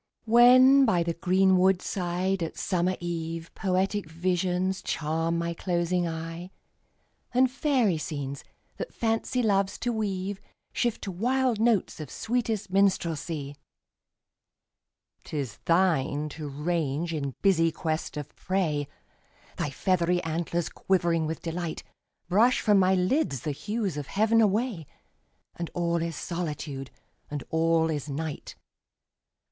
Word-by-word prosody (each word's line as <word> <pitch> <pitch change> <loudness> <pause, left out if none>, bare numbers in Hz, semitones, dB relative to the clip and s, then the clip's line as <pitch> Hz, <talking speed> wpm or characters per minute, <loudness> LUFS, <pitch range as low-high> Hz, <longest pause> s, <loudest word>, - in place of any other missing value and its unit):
When 255 +4 +7
by 185 -9 +3
the 170 0 -1
green 185 +2 +3
wood 190 0 +4
side, 185 +1 -1
at 165 - -4
summer 185 0 0
eve, 165 -1 -4
Poetic 190 -1 -1
visions 180 +2 0
charm 165 +2 -1
my 170 0 -1
closing 175 0 0
eye; 165 +2 -5 0.9
And 255 0 +4
fairy 255 - +1
scenes, 140 -3 -5 0.3
that - - -6
Fancy 230 +2 0
loves 200 -2 +1
to 240 0 -1
weave, 200 -2 -2 0.3
Shift 240 -2 -1
to 195 - -3
wild 245 +4 +1
notes 225 -7 +2
of 150 -4 -6
sweetest 225 -4 -2
Minstrelsy; 165 -7 0 1.7
'Tis 135 -8 -4
thine 155 -4 +2
to 150 0 -6
range 160 +1 -1
in 140 -4 -3
busy 165 -4 +4
quest 155 -1 -3
of 145 -2 -7
prey, 160 -7 -1 0.7
Thy 150 - -1
feathery 175 +4 +1
antlers 165 +1 -2
quivering 170 -4 +1
with 160 0 -5
delight, 170 0 -4 0.4
Brush 220 +8 +4
from 205 -3 +4
my 190 0 +4
lids 185 - +1
the 150 - -2
hues 205 +2 -3
of 145 -2 -5
heav'n 220 +3 +3
away, 210 - 0 0.7
And 170 -1 -4
all 170 -1 +1
is 165 -1 -3
Solitude, 150 -6 -4 0.4
and 145 -3 -4
all 165 0 +2
is 150 -1 -4
Night! 150 +2 -5
175 Hz, 125 wpm, -27 LUFS, 160-195 Hz, 1.7 s, When